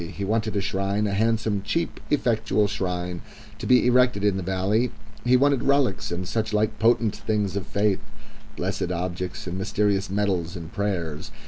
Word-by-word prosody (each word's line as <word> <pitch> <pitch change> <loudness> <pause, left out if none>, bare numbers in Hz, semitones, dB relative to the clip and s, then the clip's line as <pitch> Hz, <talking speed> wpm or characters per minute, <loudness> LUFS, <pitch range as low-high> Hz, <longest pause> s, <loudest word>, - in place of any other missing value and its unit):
He 100 - -4
wanted 110 +1 0
a 100 - +1
shrine 100 +2 0
a 100 - -1
handsome, 110 -1 +1
cheap, 165 +11 -2
effectual 110 -6 +2
shrine 90 -3 -3 0.4
to - - -4
be 125 -1 +5
erected 125 -4 +3
in 105 -2 +3
the 95 - -2
valley; 95 +6 +1 0.3
he 125 +1 +5
wanted 140 0 +3
relics 135 -7 +2
and 90 +1 -3
such 110 +1 -1
like 105 +1 +1
potent 115 -1 +3
things 105 -3 -1
of 100 -3 -3
faith, 100 -1 +1 0.6
blessed 85 - -2
objects 90 +3 -3
and 90 +1 -4
mysterious 100 0 0
medals 95 -4 0
and 85 -1 -8
prayers. 90 -7 -2
100 Hz, 165 wpm, -25 LUFS, 95-110 Hz, 0.6 s, be